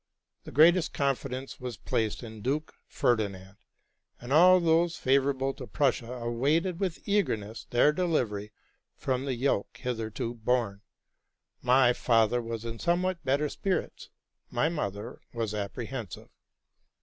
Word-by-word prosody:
The - - -8
greatest 165 +5 +5
confidence 135 -1 -2
was 125 -2 -6
placed 110 +1 -2
in 110 -2 -9
Duke 145 +7 -2
Ferdinand, 100 -4 -1 0.6
and 120 +3 -4
all 180 +4 +7
those 170 0 +2
favorable 135 0 +1
to - - -9
Prussia 130 -5 0
awaited 140 +9 0
with 185 -4 -3
eagerness 115 - -1
their 120 +5 +4
delivery 120 - -1 0.4
from 130 0 -2
the 135 -2 -1
yoke 120 -4 -1
hitherto 115 -2 -3
borne. 115 -4 -1 0.8
My 125 0 +5
father 115 0 +2
was 115 -1 -5
in 115 -1 -5
somewhat 175 +1 0
better 140 +3 +1
spirits: 190 +5 -3 0.4
my 160 - +1
mother 110 - -4
was 115 -2 -2
apprehensive. 105 0 -5
125 Hz, 125 wpm, -29 LUFS, 115-150 Hz, 0.8 s, all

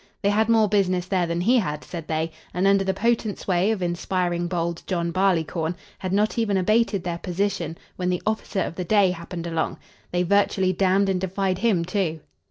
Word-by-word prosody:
They 200 - +3
had 220 +2 +2
more 225 -2 +5
business 185 -3 +1
there 185 -2 0
than 170 +1 -1
he 240 +7 +4
had, 150 -7 -3
said 170 -3 -7
they, 160 +1 -1 0.2
and, 180 +2 +1
under 195 0 +4
the 190 - +1
potent 220 +1 0
sway 185 +1 +1
of 215 -5 0
"inspiring 175 0 -1
bold 170 -1 -2
John 170 -2 -1
Barleycorn" 170 -3 +1 0.2
had 185 - -3
not 210 +4 +1
even 205 -4 +1
abated 215 0 +2
their 170 -2 -3
position 180 -3 -2 0.2
when 180 -1 -1
the 180 -1 -1
officer 215 -2 -1
of - - -2
the 180 - -4
day 195 0 +4
happened 170 0 -6
along. 165 -1 -2 0.3
They 180 0 +1
virtually 190 0 +2
damned 195 +2 +2
and 190 -2 0
defied 190 0 -1
him, 195 -6 +2
too. 180 -4 -1
185 Hz, 195 wpm, -24 LUFS, 175-200 Hz, 0.3 s, more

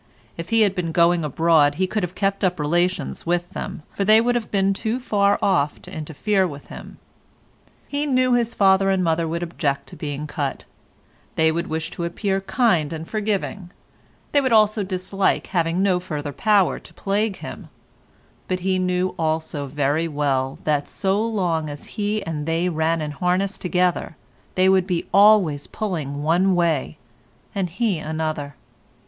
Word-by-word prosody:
If 165 +1 -7
he 225 0 +3
had 205 -3 +4
been 175 -4 -2
going 170 0 +3
abroad 150 0 +3
he 185 - +1
could 210 +3 -2
have 180 0 -4
kept 195 0 -1
up 180 -2 +1
relations 175 +4 -1
with 175 0 0
them, - - -6
for 200 - -2
they 215 +2 +6
would 240 +2 +2
have 240 -3 -2
been 195 -1 +2
too 225 +5 -2
far 205 -5 +2
off 150 -7 +1
to - - -11
interfere 185 +6 0
with 145 -3 -10
him. - - -10 0.9
He 290 +1 -2
knew 255 -2 +3
his 235 -1 +1
father 195 -1 +4
and 190 -1 +2
mother 165 0 +1
would 170 +2 -2
object 150 -5 -2
to - - -11
being 145 0 -4
cut; 145 -2 -4 0.7
they 160 0 +3
would 170 +2 -2
wish 160 0 -3
to 170 - -5
appear 195 +3 -1
kind 190 - +1
and 160 0 -6
forgiving; 205 -3 -2 0.6
they 285 - +4
would 260 -2 0
also 215 -1 +4
dislike 190 0 0
having 170 +1 +1
no 185 -3 +2
further 150 -5 -5
power 205 0 +2
to - - -16
plague 205 +1 -1
him; - - -9 0.8
but 185 -1 -2
he 185 0 +1
knew 180 0 0
also 160 -3 -1
very 145 +4 0
well 140 -3 -1
that 145 -2 0
so 195 +1 0
long 180 -9 -1
as 145 0 -8
he 210 0 -1
and 150 -2 -4
they 165 +2 +1
ran 160 0 0
in 150 -1 -3
harness 180 +6 0
together 180 -3 0 0.4
they 185 0 +4
would 190 -1 +3
be 175 -3 -1
always 195 -8 +5
pulling 150 -9 -4
one 180 +4 +3
way 165 - 0 0.6
and 190 -3 -1
he 210 -8 +1
another. 155 -2 -3
180 Hz, 170 wpm, -22 LUFS, 160-200 Hz, 0.9 s, they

